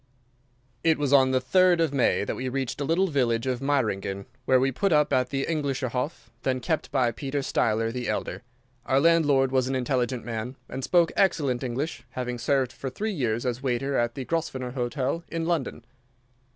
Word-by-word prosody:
It 160 -1 +4
was 145 -1 0
on 135 -2 +6
the 130 0 +2
3rd 180 +6 +4
of 160 -4 +1
May 130 -6 +2
that - - -2
we 130 0 -3
reached 135 0 -3
the 140 - -1
little 170 +6 +2
village 125 -8 +1
of 130 -2 -1
Meiringen, 100 -8 -1 0.2
where 130 -1 +4
we 135 +1 +2
put 195 +9 0
up 150 -2 +3
at 125 -1 +2
the 135 0 -1
Englischer 140 -5 -1
Hof, 130 +6 -4
then 130 -1 0
kept 155 +6 -2
by 125 -3 +2
Peter 135 +5 -3
Steiler 115 -3 0
the 125 -1 -3
elder. - - -3 0.5
Our 135 - +3
landlord 145 -4 +4
was 130 -1 +2
an 135 - -1
intelligent 125 -2 -1
man, 115 +2 -4
and 135 - -6
spoke 170 +1 +3
excellent 140 -10 +1
English, 130 +6 -3
having 125 -1 -3
served 130 0 +1
for 135 - -5
three 215 - -3
years 120 - -1
as 125 0 -2
waiter 135 +1 -1
at 120 -1 0
the 135 - -5
Grosvenor 130 -6 -2
Hotel 130 +5 -2
in 165 -1 -3
London. 160 -8 -2
130 Hz, 190 wpm, -26 LUFS, 125-145 Hz, 0.5 s, on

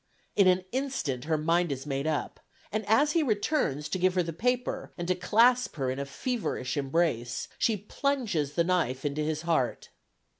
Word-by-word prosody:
In 200 -2 +5
an 185 0 +4
instant 250 - -2
her 160 0 +1
mind 165 +2 +1
is 135 0 -4
made 140 0 -2
up, 155 -2 -2 0.3
and 215 +1 -1
as 280 +8 +4
he 330 - +2
returns 210 - 0
to 185 - -2
give 185 +1 +2
her 180 - +3
the 165 0 -5
paper, 250 +7 -1
and 175 -1 -4
to 185 - +3
clasp 230 +7 +3
her 135 -4 -1
in 130 - -4
a 140 - -3
feverish 210 - -2
embrace, 135 -4 0
she 225 -2 +2
plunges 210 - -1
the 170 - +2
knife 165 -7 0
into 145 +1 -1
his 155 +1 -2
heart. 160 -7 0
170 Hz, 185 wpm, -28 LUFS, 145-220 Hz, 0.3 s, In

